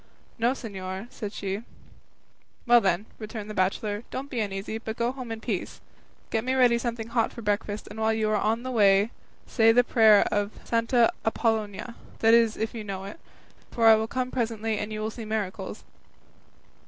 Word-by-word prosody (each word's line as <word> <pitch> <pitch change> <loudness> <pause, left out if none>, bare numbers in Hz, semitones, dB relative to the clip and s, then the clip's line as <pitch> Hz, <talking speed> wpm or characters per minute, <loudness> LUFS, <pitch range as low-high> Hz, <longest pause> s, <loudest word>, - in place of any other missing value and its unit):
"No, 235 +3 +3
señor," 190 -5 -6
said 210 -5 -6
she. 200 0 -4 1.0
"Well 240 -1 +6
then," 190 0 +1
returned 215 -1 -6
the - - -6
bachelor, 205 +2 -1
"don't 275 +2 -6
be 245 - -2
uneasy, 205 +1 -3
but 225 0 -6
go 235 +1 +1
home 255 -3 -7
in 225 - -4
peace; 210 -7 -4 0.5
get 225 -1 0
me 260 +1 0
ready 245 -2 +4
something 235 -1 -4
hot 230 -1 +1
for 235 - -9
breakfast, 205 0 -1
and 210 +1 -9
while 220 0 +2
you 220 -1 0
are - - +2
on 220 +3 0
the 255 - -4
way 205 -1 +4 0.3
say 225 -1 +4
the 245 +2 +5
prayer 220 -4 +6
of 205 0 0
Santa 230 +1 +2
Apollonia, 220 -1 -1 0.2
that 225 0 +4
is 230 -2 +4
if 220 0 -2
you 225 -2 -5
know 195 -2 -5
it; 200 - -9 0.5
for 230 - 0
I 225 - +10
will 220 0 -1
come 255 +2 -2
presently 225 -3 -1
and 210 +1 -4
you 215 0 -4
will 215 +1 -2
see 230 - -8
miracles." 215 -3 -4
220 Hz, 190 wpm, -26 LUFS, 210-235 Hz, 1.0 s, I